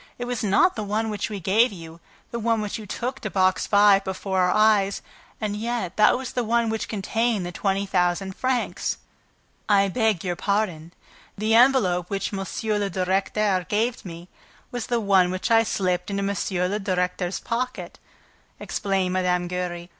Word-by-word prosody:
It 245 Hz, -, -4 dB
was 245 Hz, -2 st, -3 dB
not 210 Hz, -, +3 dB
the 220 Hz, -, -3 dB
one 215 Hz, +2 st, -1 dB
which 210 Hz, -, -3 dB
we 205 Hz, -2 st, -5 dB
gave 210 Hz, +7 st, +3 dB
you, 165 Hz, -3 st, -10 dB, 0.3 s
the 235 Hz, -, -3 dB
one 230 Hz, 0 st, +1 dB
which 210 Hz, +1 st, -4 dB
you 215 Hz, -, -9 dB
took 245 Hz, +6 st, -4 dB
to 215 Hz, -, -4 dB
Box 185 Hz, -1 st, +1 dB
Five 205 Hz, -1 st, +5 dB
before 190 Hz, 0 st, -2 dB
our 180 Hz, 0 st, +3 dB
eyes; 210 Hz, -2 st, +3 dB, 0.4 s
and 210 Hz, -2 st, -2 dB
yet 225 Hz, -4 st, -3 dB
that 215 Hz, -, +5 dB
was 260 Hz, -1 st, -6 dB
the 245 Hz, -, 0 dB
one 230 Hz, 0 st, +1 dB
which 220 Hz, -, -3 dB
contained 220 Hz, 0 st, -1 dB
the 175 Hz, -, -5 dB
twenty 195 Hz, +2 st, -1 dB
thousand 190 Hz, 0 st, 0 dB
francs." 255 Hz, -1 st, -1 dB, 0.7 s
"I 200 Hz, -1 st, +4 dB
beg 220 Hz, -3 st, +1 dB
your 180 Hz, -2 st, -2 dB
pardon. 180 Hz, -5 st, -1 dB, 0.5 s
The 215 Hz, +2 st, 0 dB
envelope 225 Hz, -8 st, +4 dB
which 200 Hz, 0 st, -3 dB
M. 195 Hz, -, -2 dB, 0.4 s
le 200 Hz, -1 st, -1 dB
Directeur 190 Hz, +1 st, 0 dB
gave 225 Hz, +3 st, 0 dB
me 170 Hz, -1 st, -9 dB, 0.4 s
was 245 Hz, -2 st, -4 dB
the 240 Hz, -2 st, +1 dB
one 195 Hz, -4 st, +3 dB
which 185 Hz, +4 st, -3 dB
I 225 Hz, 0 st, +6 dB
slipped 180 Hz, -4 st, -1 dB
into 200 Hz, 0 st, -2 dB
M. 190 Hz, -2 st, -1 dB
le 210 Hz, -, -1 dB
Directeur's 180 Hz, -1 st, -1 dB
pocket," 250 Hz, +2 st, -4 dB, 0.6 s
explained 190 Hz, -2 st, -1 dB
Mme. 180 Hz, -1 st, +1 dB
Giry. 175 Hz, -1 st, -4 dB
200 Hz, 175 wpm, -24 LUFS, 185-220 Hz, 0.7 s, I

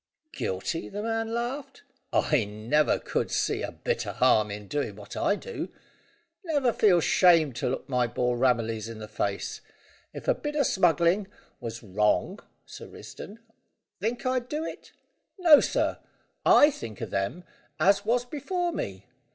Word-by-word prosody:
"Guilty?" 95 Hz, -, -3 dB
the 205 Hz, +1 st, -5 dB
man 225 Hz, 0 st, -1 dB
laughed. 260 Hz, -, -4 dB, 0.3 s
"I 150 Hz, -7 st, +2 dB
never 110 Hz, +9 st, +1 dB
could -, -, -2 dB
see -, -, 0 dB
a -, -, -3 dB
bit -, -, -2 dB
o' -, -, -3 dB
harm 110 Hz, -1 st, +3 dB
in 105 Hz, 0 st, -7 dB
doing 145 Hz, -7 st, -2 dB
what 105 Hz, 0 st, -10 dB
I 205 Hz, -, +2 dB
do. 475 Hz, -, -6 dB, 0.7 s
Never 290 Hz, -8 st, +1 dB
feel 190 Hz, -5 st, +4 dB
shamed 165 Hz, -7 st, +4 dB
to -, -, -1 dB
look 130 Hz, -, -4 dB
my 125 Hz, -3 st, +1 dB
boy 125 Hz, +1 st, 0 dB
Ramillies 115 Hz, -3 st, 0 dB
in 115 Hz, -, -7 dB
the 110 Hz, 0 st, -8 dB
face. 100 Hz, -2 st, -3 dB, 0.5 s
If -, -, -9 dB
a -, -, +5 dB
bit 295 Hz, 0 st, -5 dB
o' 290 Hz, -, +3 dB
smuggling 175 Hz, -, +2 dB, 0.3 s
was 115 Hz, -2 st, -6 dB
wrong, 105 Hz, +1 st, +1 dB, 0.3 s
Sir -, -, -10 dB
Risdon, 215 Hz, +3 st, -11 dB, 0.6 s
think 225 Hz, +7 st, -2 dB
I'd 255 Hz, -1 st, 0 dB
do 305 Hz, +2 st, -2 dB
it? -, -, -8 dB, 0.5 s
No, 330 Hz, -6 st, +8 dB
sir; -, -, 0 dB, 0.5 s
I 295 Hz, -, +7 dB
think 115 Hz, -, -8 dB
o' -, -, -3 dB
them 100 Hz, -, -3 dB, 0.4 s
as 200 Hz, +1 st, +4 dB
was 240 Hz, +3 st, +1 dB
before 345 Hz, +7 st, -2 dB
me. 95 Hz, -, -5 dB
170 Hz, 160 wpm, -27 LUFS, -, 0.7 s, No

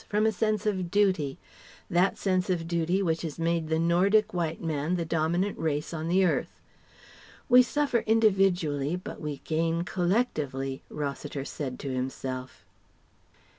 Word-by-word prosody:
from 210 Hz, +1 st, +2 dB
a 220 Hz, -, +4 dB
sense 215 Hz, +1 st, 0 dB
of 185 Hz, -4 st, -1 dB
duty, 185 Hz, -8 st, +1 dB, 0.5 s
that 180 Hz, +3 st, +2 dB
sense 185 Hz, -1 st, 0 dB
of 170 Hz, -3 st, -1 dB
duty 170 Hz, +3 st, +1 dB
which 165 Hz, -2 st, 0 dB
has 160 Hz, -4 st, -5 dB
made 165 Hz, -1 st, 0 dB
the 160 Hz, -, +2 dB
Nordic 190 Hz, +6 st, +3 dB
White 165 Hz, -2 st, -2 dB
man 160 Hz, +1 st, -1 dB
the 170 Hz, -2 st, -2 dB
dominant 170 Hz, +5 st, 0 dB
race 150 Hz, 0 st, -1 dB
on 160 Hz, 0 st, -3 dB
the 185 Hz, +2 st, +3 dB
earth. 175 Hz, -, -1 dB, 0.9 s
"We 250 Hz, 0 st, +8 dB
suffer 275 Hz, 0 st, +1 dB
individually 190 Hz, -9 st, +2 dB
but 180 Hz, -, -7 dB
we 150 Hz, -2 st, -5 dB
gain 165 Hz, +1 st, 0 dB
collectively," 155 Hz, -, -1 dB
Rossiter 140 Hz, -1 st, -4 dB
said 135 Hz, -4 st, -5 dB
to 135 Hz, -2 st, -3 dB
himself. 130 Hz, 0 st, -5 dB
170 Hz, 145 wpm, -28 LUFS, 150-195 Hz, 0.9 s, We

